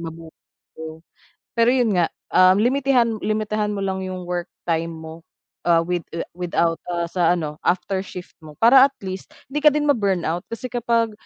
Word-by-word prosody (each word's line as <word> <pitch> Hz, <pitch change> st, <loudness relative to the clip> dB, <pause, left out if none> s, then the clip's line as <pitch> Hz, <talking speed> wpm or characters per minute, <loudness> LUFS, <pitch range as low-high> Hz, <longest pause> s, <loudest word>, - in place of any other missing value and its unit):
mabuhay 165 Hz, -1 st, -8 dB, 0.4 s
kayo. 160 Hz, 0 st, -8 dB, 0.6 s
Pero 230 Hz, +1 st, +5 dB
'yun 245 Hz, -4 st, +2 dB
nga, 170 Hz, -, +3 dB, 0.2 s
um, 185 Hz, 0 st, +6 dB
limitihan 250 Hz, -2 st, +2 dB
limitihan 215 Hz, 0 st, -1 dB
mo 200 Hz, -, -3 dB
lang 190 Hz, -1 st, -2 dB
'yung 185 Hz, -1 st, -5 dB
work 175 Hz, -1 st, -3 dB, 0.2 s
time 165 Hz, 0 st, 0 dB
mo, 160 Hz, +1 st, -10 dB, 0.4 s
ah, 170 Hz, -1 st, +5 dB
with 175 Hz, 0 st, -2 dB
ah, -, -, -4 dB
without, 170 Hz, -2 st, 0 dB
ah, 170 Hz, -1 st, -1 dB
sa 175 Hz, -1 st, +2 dB
ano 150 Hz, -3 st, -4 dB
after 190 Hz, +1 st, 0 dB
shift 180 Hz, -1 st, -10 dB
mo 150 Hz, -1 st, -12 dB
para 260 Hz, +3 st, +8 dB
at 275 Hz, -, -21 dB
least 190 Hz, 0 st, -6 dB, 0.2 s
hindi 295 Hz, -, -1 dB
ka -, -, +7 dB
din 300 Hz, 0 st, 0 dB
ma-burnout 190 Hz, -, +1 dB
kasi 230 Hz, +2 st, -6 dB
kapag, 230 Hz, -2 st, +1 dB
185 Hz, 175 wpm, -22 LUFS, 170-230 Hz, 0.6 s, para